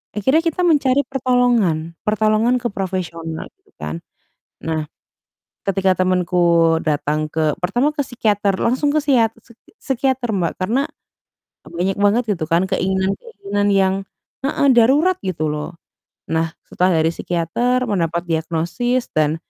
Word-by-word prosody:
Akhirnya 265 +10 +3
kita 330 +1 -1
mencari 285 -5 +3
pertolongan, 240 - +1
pertolongan 215 +3 +2
ke - - -15
profesional, 170 -4 -4 0.2
gitu - - -31
kan. 75 +2 -5 0.6
Nah, 160 -1 -2 0.8
ketika 190 -1 +2
temenku 175 -2 +3
datang 150 0 0
ke 155 -1 0
pertama 240 +11 +1
ke 300 - -4
psikiater, 205 -5 0
langsung 260 +5 +1
ke 305 - +2
siat 240 -6 +3
seki 235 0 -22
psikiater, 260 -2 -1
Mbak. 175 -4 -1
Karena 250 +10 0 0.8
m - - -12
banyak 185 +3 -1
banget, 205 +4 +3
gitu 160 - -3
kan, 170 +2 +2
keinginan-keinginan 195 - -1
yang 190 -1 +3 0.5
heeh, 280 0 +1
darurat, 285 +11 +4
gitu 170 -4 -2
loh. 150 +3 -6 0.6
Nah, 160 0 0
setelah 180 -2 +1
dari 165 - +3
psikiater 205 +11 -1
mendapat 170 -3 0
diagnosis 170 +10 -1
dan 155 0 +1
195 Hz, 130 wpm, -20 LUFS, 165-245 Hz, 0.8 s, darurat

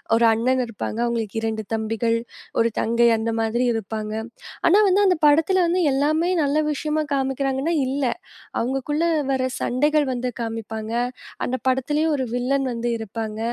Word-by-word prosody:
1 235 - +4
அண்ணன் 255 +3 +1
இருப்பாங்க. 225 0 -5
அவங்களுக்கு 225 -2 -2
2 220 -1 -2
தம்பிகள், 225 +1 0 0.4
1 230 - +3
தங்கை 235 +1 +3
அந்த 225 +1 -1
மாதிரி 235 +3 0
இருப்பாங்க. 215 0 -4 0.5
ஆனா, 365 - +6
வந்து 400 +2 +4
அந்த 365 -3 +3
படத்துல 330 +5 +4
வந்து 360 +2 +1
எல்லாமே 310 +5 +1
நல்ல 280 +1 0 0.2
விஷயமா 305 +1 -1
காமிக்கிறாங்கன்னா, 270 +3 0
இல்ல. 275 +1 -1 0.5
அவங்களுக்குள்ள 270 +6 -1 0.3
வர 260 -1 +1 0.2
சண்டைகள் 295 +4 +2
வந்து 250 0 -2
காமிப்பாங்க. 225 -1 -5 0.5
அந்த 255 - -1
படத்துலயும் 295 +5 +1
1 260 - -1
வில்லன் 270 +2 0
வந்து 235 +1 -2
இருப்பாங்க. 220 0 -5
255 Hz, 140 wpm, -23 LUFS, 225-295 Hz, 0.5 s, ஆனா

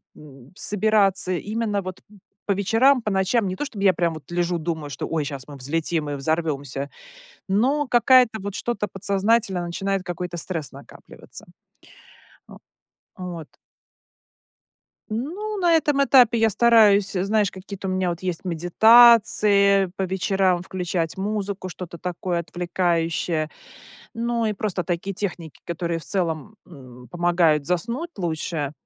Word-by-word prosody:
м, 135 -3 -15
собираться 205 -2 +1
именно 210 +2 -2
вот 185 -1 -8 0.4
по - - -1
вечерам, 225 +7 +3
по 215 - -3
ночам. 195 +3 +1
Не 185 - -3
то 295 - -4
чтобы 220 -8 -6
я 190 - +6
прям 170 -1 0
вот 155 +2 -12
лежу, 175 0 0
думаю, 160 -2 -4
что: 140 - -5
ой, 160 -2 -1
щас 140 -2 -7
мы 145 - -10
взлетим 155 +3 -2
и 145 - -3
взорвемся, 140 -2 -2 0.6
но 260 +9 +1
какая-то 245 -2 +4
вот, 200 0 -5
что-то 210 -3 -2
подсознательно 200 0 0
начинает 195 +2 -2
какой-то 175 0 -5
стресс 165 -4 -4
накапливаться. - - -12 1.0
О, - - -13 0.6
вот. 175 -4 -7 1.6
Ну, 350 - -4
на 350 -2 +3
этом 295 -3 +2
этапе 250 -4 +5
я 225 0 +3
стараюсь, 210 -3 +4
знаешь, 200 +2 0
какие-то 190 +1 -8
у - - -1
меня 185 -1 0
вот 170 -1 -5
есть 180 -1 -4
медитации, 200 +2 +5
по 195 - -1
вечерам 190 -1 0
включать 180 -2 -3
музыку, 200 -1 -3
что-то 175 -1 -8
такое 175 0 -3
отвлекающее, 170 -2 -1 0.6
ну 235 0 -1
и 215 - 0
просто 195 -3 -3
такие 180 +3 -3
техники, 175 -5 -5
которые, 170 -1 -3
в - - -12
целом, 180 +2 -3
м, 125 -6 -14
помогают 170 -2 +2
заснуть 235 - -2
лучше, 160 -4 -3
185 Hz, 135 wpm, -23 LUFS, 170-215 Hz, 1.6 s, я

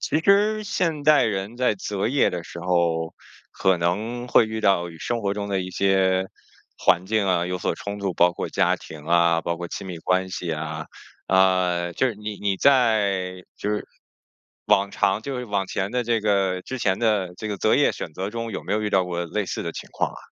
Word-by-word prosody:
其 155 - 0
实 210 +3 +3
现 170 -8 -1
代 150 0 +5
人 100 +1 -2
在 125 -3 +2
择 100 +1 -2
业 135 +2 +3
的 85 -2 -5
时 85 - -9
候， 85 -2 0 0.4
可 95 -1 +2
能 110 +9 -2
会 120 - +5
遇 110 0 -4
到 90 -4 +2
与 80 - -13
生 120 +6 -2
活 100 -1 0
中 100 0 -4
的 95 -1 0
一 90 - -6
些 95 -1 +2 0.5
环 90 +1 +2
境 105 -1 +1
啊， 90 -2 +1
有 90 0 -3
所 - - -1
冲 100 0 -6
突， 100 -2 -2
包 85 +1 +4
括 - - -4
家 - - +2
庭 75 -2 -11
啊， 85 0 +4
包 85 0 -2
括 85 +1 -5
亲 95 - -6
密 90 -2 -6
关 95 +3 0
系 90 -2 -4
啊。 75 0 -4 0.4
呃， 90 -2 +2
就 130 - +2
是 120 - -2
你 105 +1 -6
你 100 -1 0
在， 100 -8 +2
就 105 - -3
是 105 - -2 0.8
往 100 -1 +3
常， 100 +1 +1
就 135 +2 -4
是 125 - -4
往 100 -3 -1
前 95 +1 -2
的 125 0 0
这 115 -1 +1
个 95 -3 +1
之 130 +6 -6
前 95 -4 +1
的 105 -6 +1
这 110 - -6
个 100 - -3
择 - - +3
业 - - +4
选 80 - -7
择 95 +4 -3
中， 115 0 -4
有 - - -5
没 - - -5
有 110 - +1
遇 105 - -1
到 95 -2 +3
过 85 -1 -3
类 105 +4 -2
似 - - -4
的 - - -3
情 - - -8
况 - - -1
啊？ - - -11
95 Hz, 240 characters per minute, -24 LUFS, 90-110 Hz, 0.8 s, 代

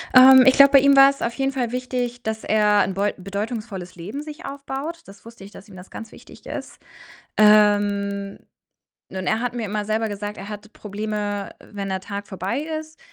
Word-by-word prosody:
Ähm, 260 0 +9
ich 260 - +7
glaube, 280 0 +7
bei 275 - +9
ihm 280 +1 +4
war's 275 0 +6
auf 235 - -2
jeden 270 +2 -1
Fall 250 -4 -2
wichtig, 250 -1 -3
dass 220 -1 -4
er 210 -1 +3
'n 195 - -3
beu 200 +2 -1
bedeutungsvolles 200 -1 -6
Leben 200 +11 -7
sich 305 +3 -10
aufbaut. 280 +4 -6
Das 195 +2 -16
wusste 230 -3 -13
ich, 200 - -12
dass 200 - -14
ihm 200 - -14
das 180 +1 -12
ganz 225 0 -9
wichtig - - -16
ist. - - -7 0.6
Ähm, 205 -1 +3 0.7
und 185 -1 -6
er 220 - +1
hat 245 0 -3
mir 240 -2 -4
immer 210 0 -3
selber 220 +1 -1
gesagt, 205 0 -6
er 200 - -8
hatte 210 0 -8
Probleme, 210 -1 -5 0.2
wenn 200 -2 -5
der 190 0 -3
Tag 200 +1 -7
vorbei 190 +5 -3 0.2
ist, 315 0 -13
215 Hz, 195 wpm, -22 LUFS, 200-255 Hz, 0.7 s, Ähm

